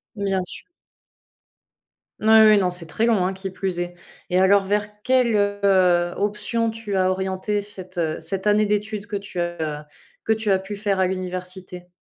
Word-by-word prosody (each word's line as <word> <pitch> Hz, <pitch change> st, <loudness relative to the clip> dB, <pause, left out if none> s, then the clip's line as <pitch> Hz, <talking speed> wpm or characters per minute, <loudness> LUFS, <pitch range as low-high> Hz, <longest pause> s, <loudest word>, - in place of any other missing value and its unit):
Bien 195 Hz, -2 st, -1 dB
su -, -, -9 dB, 1.6 s
Oui, 215 Hz, -, 0 dB, 0.2 s
oui, 210 Hz, -1 st, +6 dB
non, 185 Hz, -2 st, +2 dB
c'est 175 Hz, -2 st, -1 dB
très 220 Hz, +8 st, 0 dB
long, 210 Hz, -6 st, +3 dB
hein, 190 Hz, -, 0 dB
qui 190 Hz, 0 st, -6 dB
plus 190 Hz, -1 st, -3 dB
est, 175 Hz, 0 st, -3 dB, 0.3 s
et 180 Hz, +1 st, +2 dB
alors, 195 Hz, +1 st, +5 dB
vers 210 Hz, +1 st, -2 dB
quelle, 250 Hz, -4 st, +3 dB
heu, 190 Hz, -4 st, +2 dB
option 210 Hz, +3 st, -1 dB
tu 220 Hz, -3 st, -4 dB
as 185 Hz, 0 st, +2 dB
orienté 190 Hz, +2 st, -2 dB
cette, 185 Hz, -3 st, -11 dB
heu, 160 Hz, -2 st, -1 dB
cette 190 Hz, +5 st, -2 dB
année 210 Hz, 0 st, +4 dB
d'études 210 Hz, 0 st, -2 dB
que 220 Hz, -, -7 dB
tu 200 Hz, -2 st, -7 dB
as 160 Hz, -4 st, -3 dB, 0.4 s
que 220 Hz, -, +2 dB
tu 220 Hz, -1 st, -2 dB
as 190 Hz, -, +4 dB
pu 195 Hz, +2 st, -7 dB
faire 200 Hz, -2 st, -1 dB
à 185 Hz, -, +3 dB
l'université? 185 Hz, -1 st, -5 dB
195 Hz, 180 wpm, -22 LUFS, 180-210 Hz, 1.6 s, oui